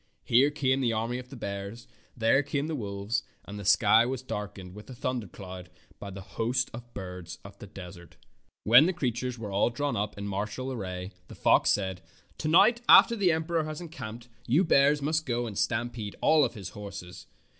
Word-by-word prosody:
Here 130 +5 +4
came 135 -3 0
the 120 -3 +1
army 115 +3 -2
of 125 0 -11
bears, 100 +3 -6 0.3
there 115 +4 +3
came 145 0 -2
the 160 - -3
wolves, 100 -3 -2 0.2
and 105 0 -8
the - - -7
sky 110 +3 +5
was 130 +1 -3
darkened 105 -5 -6
as - - -14
with 105 +4 -12
a 130 - -8
thundercloud 95 -7 -5 0.3
by 100 - -7
the 95 0 -8
host 120 +4 -1
of 120 +1 -10
birds 90 -2 -7
of 100 0 -12
the 105 - -10
desert. 90 -2 -11 0.5
When 120 +9 +7
the 185 - 0
creatures 125 -5 -2
were 105 -3 -6
all 100 +4 +2
drawn 145 +4 -2
up 105 +1 -3
in 100 0 -5
martial 105 +7 -3
array 95 -5 -5 0.2
the - - -11
fox - - +3
said: 95 -2 0 0.4
"To 155 - -2
night, 215 +9 +5
after 235 - +8
the 195 -5 +3
emperor 160 0 0
has 155 -1 -5
encamped, 120 -9 -8 0.2
you 145 +10 +4
bears 145 -3 +4
must 160 +1 0
go 120 -1 -1
and 110 -3 -6
stampede 115 -1 -2
all 150 -5 +4
his 100 -6 -8
horses. 100 -2 -9
115 Hz, 190 wpm, -28 LUFS, 100-135 Hz, 0.5 s, after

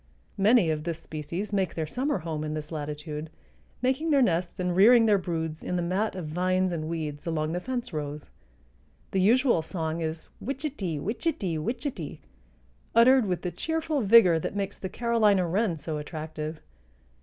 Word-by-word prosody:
Many 205 -4 +5
of 150 -1 -2
this 165 -1 -3
species 165 +6 -5
make 190 -2 0
their 160 - -1
summer 265 - -1
home 155 -2 -4
in 155 0 -3
this 150 +1 -6
latitude, 150 0 -5 0.5
making 265 +6 +1
their 280 -3 +5
nests 175 -4 0
and 180 -1 0
rearing 225 +5 +7
their 210 -2 +4
broods 160 -3 -3
in 180 - -3
the 175 - 0
mat 190 +5 0
of 180 -3 -5
vines 185 +3 +1
and 155 -2 -3
weeds 155 -2 -4
along 155 -1 -1
the 175 - -1
fence 245 -2 -4
rows. 150 -1 -4 0.8
The 190 - +1
usual 235 - +4
song 160 -1 -3
is 160 0 -4
wichety, 260 - -3
wichety, 205 - -2
wichety, 235 - -4 0.8
uttered 245 0 +6
with 180 -2 -2
the 180 - -2
cheerful 320 - -1
vigor 200 -6 +6
that 175 - -4
makes 200 -1 -2
the 190 - -4
Carolina 215 -4 +2
wren 185 0 0
so 150 0 -4
attractive. 155 0 -6
180 Hz, 165 wpm, -27 LUFS, 160-225 Hz, 0.8 s, rearing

